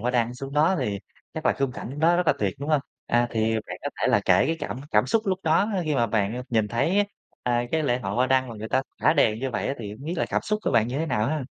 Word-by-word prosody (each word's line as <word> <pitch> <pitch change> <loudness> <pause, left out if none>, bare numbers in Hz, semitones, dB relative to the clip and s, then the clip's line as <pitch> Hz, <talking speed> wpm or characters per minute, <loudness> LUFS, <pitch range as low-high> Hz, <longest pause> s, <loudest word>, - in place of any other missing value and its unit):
hoa 120 +3 0
đăng 120 -1 0
xuống 135 +2 -7
đó 155 +6 +3
thì 105 -6 -1 0.4
chắc - - -3
là - - +5
khung 135 -2 0
cảnh 135 +4 -7
đó 170 +2 +4
rất 180 -1 0
là - - +6
tuyệt, 100 -3 0
đúng 145 +3 -5
hông? 150 -2 +3 0.3
À, 120 0 +2
thì 110 0 +1
bạn - - -6
có - - -2
thể - - +2
là - - +4
kể - - +4
cái 165 +1 0
cảm 130 - -5
cảm - - +3
xúc 225 -2 +1
lúc 185 -1 +1
đó 165 +6 +3 0.2
khi 155 -2 0
mà 120 -3 +2
bạn 110 +3 -1
nhìn 110 -3 +1
thấy, 180 - +2 0.4
a, 120 -1 +1
cái 160 -1 +2
lễ 125 -3 +1
hội 100 -5 -4
hoa 125 +3 +2
đăng 130 -1 +2
mà 115 - -7
người 110 +1 -6
ta 130 +3 +2 0.2
thả - - +5
đèn 110 0 +3
như 135 +1 -2
vậy - - -2
á, 135 - -1
thì 105 -3 -6
hông 130 +7 -11
biết 165 - -3
là - - +1
cảm - - 0
xúc 210 0 -1
của - - 0
bạn 115 0 +3
như 135 +4 -2
thế 160 - -1
nào 110 -7 0
ha? 150 -1 -1
130 Hz, 305 wpm, -25 LUFS, 115-155 Hz, 0.4 s, là